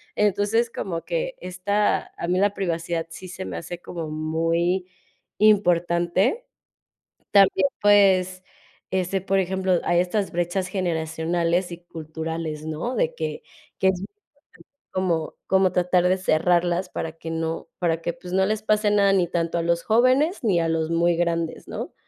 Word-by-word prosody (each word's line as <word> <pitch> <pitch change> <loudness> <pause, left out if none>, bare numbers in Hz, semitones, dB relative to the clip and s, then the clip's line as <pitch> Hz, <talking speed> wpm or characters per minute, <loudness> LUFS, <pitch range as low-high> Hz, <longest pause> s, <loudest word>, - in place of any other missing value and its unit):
Entonces, 210 +3 +2
como 170 -7 -4
que - - -2
esta 200 +3 -1
a 170 - -4
mí 180 +1 +2
la 200 +1 +2
privacidad 170 -3 -2
sí 185 +3 -9
se 185 +1 -6
me - - -5
hace 170 +1 -6
como 165 -3 -6
muy 165 +4 0 0.5
importante. 185 - +2 0.9
También, 195 -1 +5
pues, 190 -3 +4 0.5
este, 190 +1 0
por 195 +1 +1
ejemplo, 185 -1 0
hay 175 - +2
estas 195 +3 0
brechas 175 +2 -1
generacionales 170 0 -1
y 170 - -7
culturales, 160 -1 -5
¿no? 160 +11 -3
De - - 0
que, 480 - -4 0.4
que 190 - +3
es 190 - 0
muy 195 - -5
importante 365 -8 -25 0.2
como 170 -4 -1
como 190 -1 +3
tratar 180 0 +2
de 185 +1 +2
cerrarlas 175 +1 +1
para 160 -3 -4
que 165 0 -7
no 165 0 -3
para 165 -2 0
que, 170 - -2
pues 180 +1 -10
no 190 0 +3
les 215 +2 -1
pase 215 -1 +2
nada 200 -1 +4
ni 185 -3 +2
tanto 170 0 -1
a - - +1
los 170 0 +1
jóvenes 255 - +3
ni 195 -6 +3
a 165 -1 0
los 160 0 -1
muy 170 +1 +2
grandes, 170 -1 -1
¿no? - - -6
180 Hz, 160 wpm, -24 LUFS, 170-195 Hz, 0.9 s, También